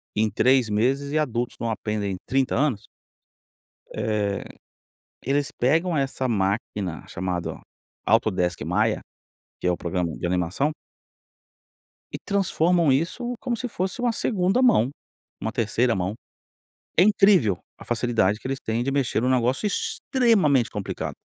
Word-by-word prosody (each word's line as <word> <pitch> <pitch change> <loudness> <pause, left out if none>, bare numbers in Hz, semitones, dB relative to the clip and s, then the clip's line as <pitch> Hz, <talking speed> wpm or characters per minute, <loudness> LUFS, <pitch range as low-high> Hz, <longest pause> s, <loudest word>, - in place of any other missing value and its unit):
em 110 +1 +2
3 125 +2 +3
meses 135 +7 +1
e 155 - +1
adultos 120 -4 -1
não 115 - -2
aprendem 105 -3 -2
30 135 0 +1
anos, 120 -6 0 1.1
eh, 105 -2 -1 0.8
eles 140 +2 +1
pegam 165 +7 +1
essa 135 -1 -1
máquina 100 -4 -2
chamada 90 -2 -3 0.5
Autodesk 90 -1 +1
Maia, - - +1 0.6
que - - -7
é - - +4
o 90 - -1
programa 85 -1 -2
de - - -4
animação 90 - 0 1.4
e - - -4
transformam 175 -5 +2
isso 210 - -1
como 245 -2 -2
se 250 +2 -4
fosse 190 +2 -3
uma 240 -1 +1
2º 200 +1 +1
mão, 175 - +4 0.5
uma 110 - -3
3º 115 0 +1
mão. 95 +2 -2 0.8
É 175 - +7
incrível 195 - +4 0.2
a - - -12
facilidade 115 -4 +1
que - - -6
eles 135 0 -3
têm 115 +2 -2
de 135 - -1
mexer 135 -5 0
em 125 - +2
um - - +3
negócio 130 - +1
extremamente 200 - +2
complicado. 105 -3 -4
125 Hz, 140 wpm, -24 LUFS, 105-165 Hz, 1.4 s, É